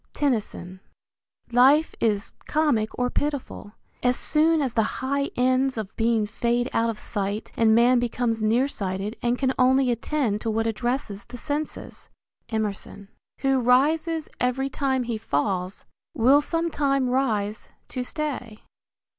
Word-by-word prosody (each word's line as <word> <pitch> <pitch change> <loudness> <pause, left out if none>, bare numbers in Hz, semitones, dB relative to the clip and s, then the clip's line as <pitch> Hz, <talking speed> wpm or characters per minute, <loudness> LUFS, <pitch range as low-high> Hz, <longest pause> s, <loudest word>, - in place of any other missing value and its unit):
Tennyson. 215 -9 -2 0.7
Life 270 +6 +5
is 210 -2 0 0.2
comic 290 -9 +1
or 250 0 0
pitiful, 285 -7 -3 0.3
as 250 0 +2
soon 320 +1 +2
as 265 -5 -1
the 225 - +3 0.2
high 280 +2 -1
ends 255 +1 +2
of 215 -2 -5
being 225 -1 +1
fade 235 +3 -1
out 230 0 +2
of 225 - -3
sight 205 0 -4
and 220 -1 +4
man 240 +2 +5
becomes 240 -1 -1
near 230 +5 +2
sighted 195 -2 -4
and 240 +1 +1
can 265 0 +1
only 260 0 +4
attend 235 -3 -1
to 225 - -2
what 225 +1 0
addresses 230 -2 -2
the 245 - -9
senses 295 +4 -5 0.4
Emerson. 205 -2 -4 0.3
Who 270 -1 +2
rises 305 +6 +2
every 265 +2 0
time 265 -1 0
he 230 -2 -3
falls 180 +3 -2 0.3
Will 265 +3 +5
sometime 290 -5 0
rise 220 -5 -1 0.2
to 250 - -3
stay. 250 -6 -5
245 Hz, 140 wpm, -25 LUFS, 220-275 Hz, 0.7 s, Life